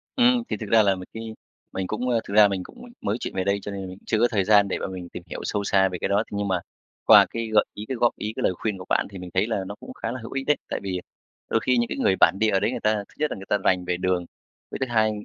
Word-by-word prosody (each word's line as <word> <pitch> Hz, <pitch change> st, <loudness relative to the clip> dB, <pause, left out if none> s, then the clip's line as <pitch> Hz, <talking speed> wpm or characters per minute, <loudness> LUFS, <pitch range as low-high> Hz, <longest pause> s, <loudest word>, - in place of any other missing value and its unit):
Ừm, 245 Hz, -1 st, +4 dB
thì -, -, -1 dB
thực 110 Hz, -3 st, -7 dB
ra 110 Hz, 0 st, +6 dB
là 100 Hz, -1 st, +3 dB
mình 90 Hz, 0 st, -9 dB
khi 115 Hz, 0 st, -6 dB, 0.4 s
mình 95 Hz, -1 st, -3 dB
cũng 125 Hz, +5 st, -2 dB
a, 120 Hz, -, +2 dB
thực 100 Hz, -, -6 dB
ra 105 Hz, 0 st, +8 dB
mình 95 Hz, -2 st, -3 dB
cũng 245 Hz, -, -13 dB, 0.2 s
mới 105 Hz, +2 st, -1 dB
chuyển -, -, -5 dB
về 95 Hz, -, 0 dB
đây 100 Hz, +1 st, +1 dB
cho 100 Hz, -, -6 dB
nên 95 Hz, -1 st, -5 dB
mình 90 Hz, 0 st, -9 dB
chưa 110 Hz, -, +1 dB
có 120 Hz, -, +5 dB
thời 100 Hz, -4 st, +2 dB
gian 100 Hz, 0 st, +5 dB
để 95 Hz, -, -2 dB
mà -, -, -3 dB
mình 90 Hz, -2 st, -7 dB
tìm 90 Hz, -, -8 dB
hiểu -, -, -5 dB
sâu 105 Hz, -1 st, -1 dB
xa 95 Hz, -1 st, +3 dB
về 90 Hz, -, -4 dB
cái -, -, +1 dB
đó. 100 Hz, +2 st, +2 dB
Thế -, -, -5 dB
nhưng 100 Hz, 0 st, -1 dB
mà 95 Hz, -2 st, +1 dB, 0.5 s
qua -, -, +9 dB
cái 115 Hz, -1 st, -4 dB
gợi 105 Hz, -, +6 dB
ý, 105 Hz, -, -7 dB
cái 130 Hz, -, -2 dB
góp 120 Hz, 0 st, +2 dB
ý, 105 Hz, +1 st, -4 dB
cái -, -, -3 dB
lời -, -, +2 dB
khuyên 105 Hz, +2 st, -3 dB
của 90 Hz, -, -9 dB
bạn -, -, +2 dB
thì 100 Hz, -, -8 dB
mình 90 Hz, -1 st, -8 dB
thấy 95 Hz, +3 st, +2 dB
là 110 Hz, -4 st, -1 dB
nó 100 Hz, -, -6 dB
cũng -, -, -10 dB
khá 115 Hz, -, -4 dB
là 130 Hz, -, -5 dB
hữu 115 Hz, -, -8 dB
ích 135 Hz, 0 st, -3 dB
đấy. 150 Hz, -, +4 dB
Tại -, -, -2 dB
vì 95 Hz, -2 st, -2 dB, 0.5 s
đôi 115 Hz, -, +2 dB
khi 125 Hz, +2 st, +1 dB
những 120 Hz, 0 st, +2 dB
cái -, -, -4 dB
người 95 Hz, -, +3 dB
bản -, -, +6 dB
địa 110 Hz, -, +3 dB
ở 95 Hz, -, +3 dB
đấy 105 Hz, -, 0 dB
người 125 Hz, -, -3 dB
ta 110 Hz, -1 st, +2 dB
thứ -, -, -21 dB
nhất 150 Hz, 0 st, 0 dB
là -, -, -4 dB
người 95 Hz, -, -9 dB
ta 105 Hz, -, +3 dB
rành 90 Hz, -2 st, +1 dB
về 90 Hz, 0 st, -1 dB
đường, 90 Hz, -1 st, 0 dB, 0.5 s
với -, -, -4 dB
thứ 135 Hz, -, +1 dB
hai, 110 Hz, -2 st, +3 dB
100 Hz, 335 wpm, -24 LUFS, 95-115 Hz, 0.5 s, qua